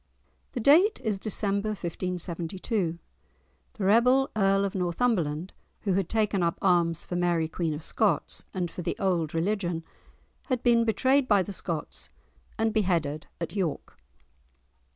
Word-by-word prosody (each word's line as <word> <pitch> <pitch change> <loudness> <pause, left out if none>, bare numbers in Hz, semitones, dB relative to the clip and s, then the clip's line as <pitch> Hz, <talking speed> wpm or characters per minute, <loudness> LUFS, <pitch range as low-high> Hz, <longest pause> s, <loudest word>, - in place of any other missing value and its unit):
The 250 - -3
date 330 - +5
is 210 -4 0
December 200 0 +1
1572. 180 0 -2 0.8
The 210 - -6
rebel 250 +6 +4
Earl 195 -1 +3
of 195 - -3
Northumberland, 180 -3 -1 0.3
who 195 - 0
had 190 -2 0
taken 210 -3 +1
up 170 -1 0
arms 170 -3 +2
for 180 - -5
Mary 175 -2 +1
Queen 160 0 -2
of 150 - -7
Scots, - - 0
and 180 -3 -3
for - - -6
the - - -2
old 170 -5 0
religion, 175 -1 -1 0.6
had 255 -5 -1
been 235 -1 +4
betrayed 260 +4 +2
by 205 -4 +4
the 200 - -6
Scots 165 -4 -5 0.5
and 225 -1 +1
beheaded 170 -8 0
at 170 +4 -5
York. 180 -7 -3
190 Hz, 140 wpm, -27 LUFS, 170-215 Hz, 0.8 s, date